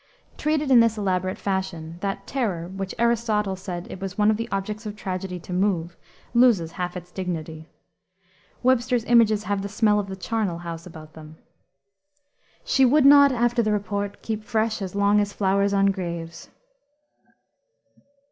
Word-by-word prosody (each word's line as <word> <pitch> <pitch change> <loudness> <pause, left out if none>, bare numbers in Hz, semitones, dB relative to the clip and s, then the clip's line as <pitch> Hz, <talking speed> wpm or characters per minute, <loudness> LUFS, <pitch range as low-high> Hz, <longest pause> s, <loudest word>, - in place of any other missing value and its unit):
Treated 305 -2 0
in 250 - +8
this 230 -1 +3
elaborate 185 -2 -1
fashion, 175 -4 -4
that 195 0 -3
"terror," 200 -11 -2
which 190 +1 -6
Aristotle 225 -4 +1
said 180 -1 -6
it 190 - -8
was 195 0 -5
one 210 0 +4
of 215 - 0
the 230 - -4
objects 210 +3 -3
of 210 - -6
tragedy 185 -2 -5
to 180 - -8
move, 180 -3 0 0.4
loses 235 -10 +4
half 180 +1 -4
its 175 0 -10
dignity. 160 -4 -5 0.9
Webster's 250 -1 +2
images 220 -3 +4
have 200 0 -1
the 200 - -5
smell 210 0 +2
of 200 - -3
the 190 - -6
charnel 195 -2 -2
house 170 0 -7
about 155 -2 -12
them. 155 0 -12 1.3
"She 270 - +3
would 270 +3 +5
not 280 0 +8
after 240 -1 +1
the 215 -2 0
report 205 0 -3
keep 220 -1 -3
fresh 220 -1 -1
As 190 -1 -5
long 200 +1 +3
as 205 -1 -1
flowers 200 0 +1
on 195 0 +3
graves." 170 -3 -6
200 Hz, 160 wpm, -24 LUFS, 180-225 Hz, 1.3 s, in